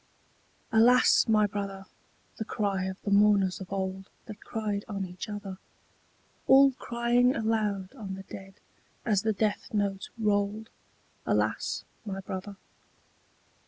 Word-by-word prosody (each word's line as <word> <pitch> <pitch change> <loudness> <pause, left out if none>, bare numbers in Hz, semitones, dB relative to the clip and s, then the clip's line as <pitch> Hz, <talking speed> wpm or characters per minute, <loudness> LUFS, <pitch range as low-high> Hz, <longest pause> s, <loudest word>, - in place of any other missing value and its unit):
ALAS 240 +4 +5
my 215 -1 +4
brother! 195 -1 -4 0.5
the - - -2
cry 200 -3 -1
of 190 0 -5
the 200 - -2
mourners 200 -2 +4
of 190 - -9
old 190 0 -3 0.2
That 215 -1 -10
cried 210 -2 -3
on 195 -3 -3
each 180 +4 -7
other, 200 -2 -6 0.9
All 270 +1 +7
crying 245 0 +1
aloud 215 -4 -1
on 205 -7 -6
the 195 - -9
dead 195 0 -10 0.5
as 205 -4 +2
the 220 - +1
death 210 0 -1
note 200 -2 -1
rolled, 210 0 0 0.6
Alas - - 0 0.2
my 195 -3 -5
brother! 195 +1 -6
205 Hz, 125 wpm, -28 LUFS, 195-220 Hz, 0.9 s, All